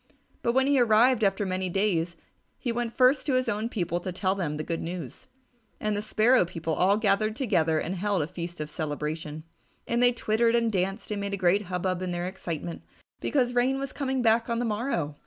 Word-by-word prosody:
But 235 - +1
when 265 +1 +3
he 280 -1 +3
arrived 235 +1 +4
after 195 0 +2
many 185 0 -2
days, 175 -3 0 0.4
he 245 - -2
went 235 0 -3
first 260 +4 +4
to 270 - +2
his 255 0 +1
own 215 +3 -1
people 175 -6 -2
to 185 +1 -4
tell 185 +1 0
them 165 -6 -3
the 155 - -3
good 165 +1 -3
news. 165 -7 -6 0.5
And 215 -1 -1
the 205 - -1
Sparrow 220 +3 +4
people 165 -2 -4
all 195 +5 +3
gathered 215 0 +2
together 170 - +1
and 170 - -2
held 195 -2 0
a - - -4
feast 175 -1 -6
of 150 - -3
celebration, 155 0 -4 0.4
and 235 +1 +1
they 245 0 +6
twittered 230 0 +1
and 230 -1 +2
danced 195 +2 -2
and 205 -1 -2
made 200 0 -2
a - - -6
great 190 +2 +2
hub 180 -1 -3
bub 185 -1 -1
in 185 - -2
their 175 0 -2
excitement 170 -3 -5 0.4
because 250 -4 +1
Rain 250 +2 +2
was 275 0 -4
coming 265 -3 -1
back 230 +1 +3
on 235 - 0
the 240 - 0
morrow. 210 - -2
200 Hz, 215 wpm, -27 LUFS, 175-235 Hz, 0.5 s, they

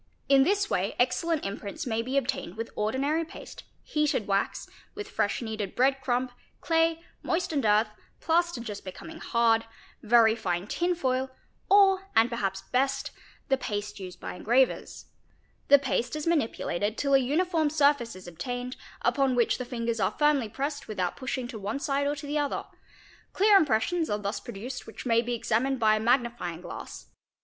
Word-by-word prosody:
In 275 -1 +6
this 400 +7 +2
way 195 - -1
excellent 310 +5 +1
imprints 200 0 -5
may 225 -2 0
be 260 +4 -2
obtained 240 -7 -2
with 230 +1 -5
ordinary 275 +9 0
paste, 320 - -11 0.2
heated 300 -8 0
wax, 195 0 -1 0.3
with 415 0 -6
fresh 240 - -1
kneaded 215 -4 -4
bread 265 +2 +2
crumb, 250 -1 0 0.3
clay, 330 0 +1 0.2
moistened 330 -6 -1
earth, 210 +1 +4 0.3
plaster 340 -3 +1
just 210 -3 -6
becoming 320 - -9
hard, 230 -1 +2 0.4
very 225 0 +5
fine 180 -5 -2
tin 350 +11 0
foil, 260 -4 0 0.4
or, 390 -1 +5
and 225 +2 +5
per 235 - -2
haps 195 -3 -2
best, 270 +2 0 0.4
the 270 - +2
paste 205 -2 -4
used 180 -2 -8
by - - -6
engravers®®, 250 +6 +1 0.6
The 285 - +8
paste 260 -2 -1
is 305 - -4
manipulated 225 - 0
till 280 -1 0
a 270 - +7
uniform 315 +4 +1
surface 285 -6 +2
is 185 -1 -11
obtained, 245 +9 -5 0.3
upon 270 -2 +2
which 240 0 +2
the 250 - -3
fingers 235 -2 -2
are 190 - 0
firmly 295 -6 +3
pressed 280 +6 -4
with 215 -3 -6
out 180 -1 0
pushing 260 -1 -3
to 220 - -7
one 205 +5 -3
side 280 0 0
or 290 - 0
to 290 0 -8
the 295 +1 -1
other; 290 -1 -2 0.7
clear 410 +1 +5
impressions 320 - +2
are 205 - 0
thus 205 0 -3
produced 240 +3 -7
which 225 - -9
may 230 -2 +3
be 240 +1 -2
examined 240 +3 0
by 215 -1 +4
a - - -2
magnifying 235 -7 0
glass. - - -8
250 Hz, 175 wpm, -28 LUFS, 220-290 Hz, 0.7 s, The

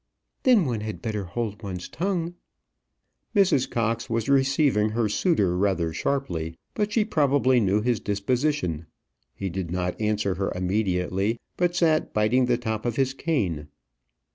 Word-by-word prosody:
"Then 240 -9 +5
one 120 -5 -1
had 110 0 -5
better 105 -5 -3
hold 105 +3 -4
one's 90 -4 -5
tongue." 175 -1 -2 1.0
Mrs. 185 -10 +3
Cox 115 0 -1
was 115 -1 -1
receiving 135 -5 +3
her 110 0 0
suitor 105 - +1
rather 90 -4 +1
sharply; 85 - -2 0.2
but 210 -1 -1
she 215 -1 +2
probably 140 - +3
knew 105 -1 +2
his 120 0 +1
disposition. 105 - -1 0.5
He 95 - -4
did 90 -1 -4
not 90 +3 -2
answer 105 -2 +1
her 95 - 0
immediately, 95 +2 0 0.2
but 175 0 +1
sat 160 -3 +2
biting 110 +4 +3
the 120 -1 +2
top 110 -3 -3
of 120 -2 -1
his 135 0 +1
cane. 95 - -1
110 Hz, 145 wpm, -25 LUFS, 95-140 Hz, 1.0 s, Then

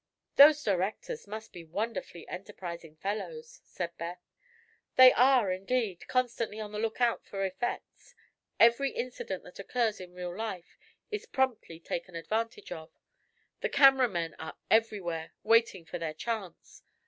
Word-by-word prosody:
"Those 295 +1 +8
directors 205 - -2
must 220 +2 -7
be 175 - -9
wonderfully 185 0 -4
enterprising 175 -4 -7
fellows," 465 - -5
said 170 -1 -5
Beth. 170 +2 -5 0.8
"They 255 0 +10
are, 250 -5 +5
indeed, 195 0 -2
constantly 235 -4 -1
on 210 -1 -5
the 210 - -4
lookout 225 +2 +1
for 195 -1 -3
effects. 190 +6 -5 0.4
Every 235 +4 +5
incident 240 -8 -5
that 180 - -13
occurs 225 +1 0
in 180 -1 -10
real 180 -1 -5
life 195 -5 -6 0.3
is 425 -1 -4
promptly 250 -11 -1
taken 170 +1 -5
advantage 225 +7 -3
of. 160 -2 -7 0.7
The - - -1
camera 270 -2 +6
men 170 -4 -2
are 160 - -7
everywhere, 190 -8 +1
waiting 225 -6 +3
for 175 - -6
their 160 -2 -3
chance. 215 -2 -5
210 Hz, 135 wpm, -30 LUFS, 175-240 Hz, 0.8 s, They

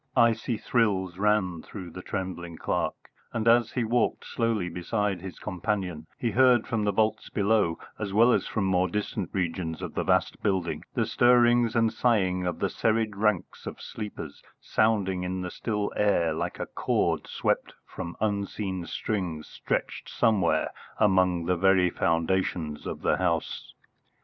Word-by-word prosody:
Icy 115 0 +3
thrills 100 -6 0
ran 100 -5 +1
through 90 -2 -9
the 90 - -8
trembling 90 -3 -5
clerk, - - -2 0.2
and 115 0 -1
as 120 +1 +4
he 125 - 0
walked 115 +1 0
slowly 115 -6 0
beside 95 +1 -2
his 95 -1 -8
companion 90 -4 -3
he 115 - -1
heard 125 0 +5
from 110 -2 -1
the 105 - +2
vaults 110 +1 0
below, 100 -5 +2 0.2
as 105 -2 -3
well 115 +5 +5
as - - +1
from 110 - -1
more 95 -1 +2
distant 105 -2 -3
regions 85 -3 -2
of - - -6
the - - -1
vast - - +1
building, 95 -5 0
the - - +2
stirring 120 -1 +4
and 115 -1 +3
sighing 95 -7 +1
of 90 - -2
the - - 0
serried 110 -2 0
ranks 105 -2 -1
of - - -6
sleepers, 105 -9 -7 0.2
sounding 100 -4 +1
in 90 +1 -3
the 90 - -4
still 105 -3 -2
air 85 -6 +2
like 85 +2 -3
a - - -2
chord - - 0
swept - - -1
from 85 - -7
unseen 100 -3 -2
strings 90 -8 -3
stretched - - -3
somewhere 95 -9 +2 0.3
among 90 -4 +3
the 90 +1 +2
very 90 0 +4
foundations 85 -2 0
of - - -6
the - - +2
house. 85 -3 -2
100 Hz, 155 wpm, -27 LUFS, 90-110 Hz, 0.3 s, heard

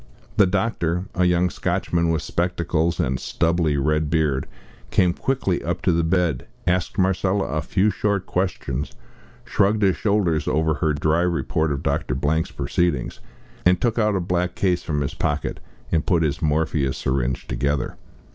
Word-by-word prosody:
The 100 -3 +6
doctor 90 -3 0
a 90 - +2
young 90 0 +2
Scotchman 85 -1 0
with 80 -1 0
spectacles, 85 -1 0
and 65 -6 0
stubbly 85 -3 +1
red 75 +2 +1
beard 75 -5 +1 0.4
came 90 -2 +3
quickly 125 -6 -1
up 85 +3 -3
to 90 - +3
the 85 0 +2
bed, 85 -5 0 0.2
asked 90 +2 0
Marcella 95 +1 +2
a 75 - -2
few 95 +7 +1
short 100 0 -1
questions, 85 -7 -2 0.5
shrugged 105 +1 +2
his 95 -2 +4
shoulders 95 -8 +1
over 80 +1 +2
her 75 0 0
dry 80 +3 +1
report 85 -2 0
of 70 - -3
Dr. 65 - -1
Blank's 80 +4 0
proceedings, 85 -8 -1 0.4
then 90 +1 +5
took 115 +4 0
out 105 -2 +2
a - - +1
black 90 0 -1
case 90 -3 +1
from 75 -4 -2
his 70 - -2
pocket, 75 0 -2 0.3
and 80 -2 +2
put 85 -3 +2
his 75 +1 -1
morphia 75 -3 +1
syringe 65 -2 -1
together. 70 0 -1
85 Hz, 160 wpm, -23 LUFS, 75-90 Hz, 0.5 s, The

